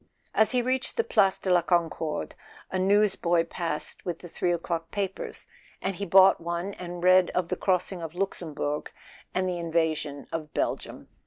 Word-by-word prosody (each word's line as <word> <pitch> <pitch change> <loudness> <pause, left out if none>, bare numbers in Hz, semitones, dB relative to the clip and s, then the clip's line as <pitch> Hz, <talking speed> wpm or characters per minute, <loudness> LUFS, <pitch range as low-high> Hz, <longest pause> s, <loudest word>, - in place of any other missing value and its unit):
As 220 - +4
he 250 -1 +2
reached 255 +1 -1
the 460 - +3
Place 200 - +3
de 190 - -2
la 175 - +5
Concorde 165 - -1 0.4
a 185 - -1
newsboy 190 -3 +3
passed 165 -2 -4
with 175 -3 -3
the 175 - -10
three 175 +1 -1
o'clock 165 -1 -2
papers, 195 -2 -4 0.3
and 195 - -2
he 200 - -3
bought 190 +1 +7
one 170 +3 -3
and 175 -1 -7
read 185 0 +6
of 180 -2 0
the - - 0
crossing 180 -1 0
of 165 0 -6
Luxembourg 160 -6 -3 0.4
and 185 0 +1
the 180 -1 -2
invasion 160 -4 -1
of 155 -2 -5
Belgium. - - -2
175 Hz, 170 wpm, -27 LUFS, 165-190 Hz, 0.4 s, bought